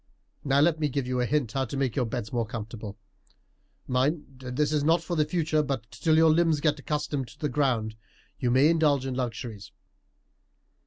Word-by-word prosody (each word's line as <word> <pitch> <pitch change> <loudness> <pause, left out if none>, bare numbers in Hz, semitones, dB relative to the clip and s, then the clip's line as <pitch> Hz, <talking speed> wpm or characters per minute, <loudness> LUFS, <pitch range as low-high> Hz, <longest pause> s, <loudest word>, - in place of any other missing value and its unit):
Now, 140 0 +3
let 160 0 +3
me 150 -2 +1
give 140 -1 -2
you 125 0 -1
a 120 - 0
hint 145 -6 0
how 135 +3 -1
to 135 +3 -5
make 130 -4 0
your 125 -4 +1
beds 115 -1 -4 0.2
comfortable. 110 -2 -7 0.9
Mind, 135 +1 -1
this 130 +4 -1
is 150 -2 +1
not 165 +3 +3
for 175 - -3
the 155 -2 +2
future, 155 -1 +1
but 135 -6 -4
till 160 -1 +2
your 160 0 +6
limbs 165 -1 +3
get 150 0 +1
accustomed 145 -2 -2
to - - -16
the 150 - -1
ground 125 -6 0 0.4
you 125 -4 0
may 130 +4 +5
indulge 155 -5 +3
in 135 - -2
luxuries. 120 -4 -5
140 Hz, 190 wpm, -27 LUFS, 125-150 Hz, 0.9 s, your